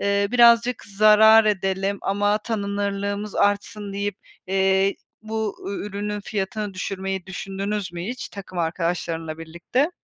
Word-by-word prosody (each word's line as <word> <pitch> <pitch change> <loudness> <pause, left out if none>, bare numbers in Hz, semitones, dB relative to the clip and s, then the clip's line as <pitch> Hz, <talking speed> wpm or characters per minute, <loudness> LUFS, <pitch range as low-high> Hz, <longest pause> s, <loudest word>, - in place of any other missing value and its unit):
eee, 200 0 +1
birazcık 235 0 +5
zarar 215 +2 +6
edelim 195 -1 0
ama 205 +1 +1
tanınırlığımız 200 -1 -3
artsın 205 0 0
deyip, 200 0 -2 0.3
eee, 190 +1 +2 0.3
bu 220 -1 -3
ü 200 - -4
ürünün 205 +1 -4
fiyatını 205 0 -3
düşürmeyi 190 0 -4
düşündünüz 195 0 -4
mü 170 -1 -5
hiç 245 +4 -5
takım 195 -2 -8
arkadaşlarınla 165 -1 -2
birlikte? 170 - -1
200 Hz, 120 wpm, -23 LUFS, 190-210 Hz, 0.3 s, zarar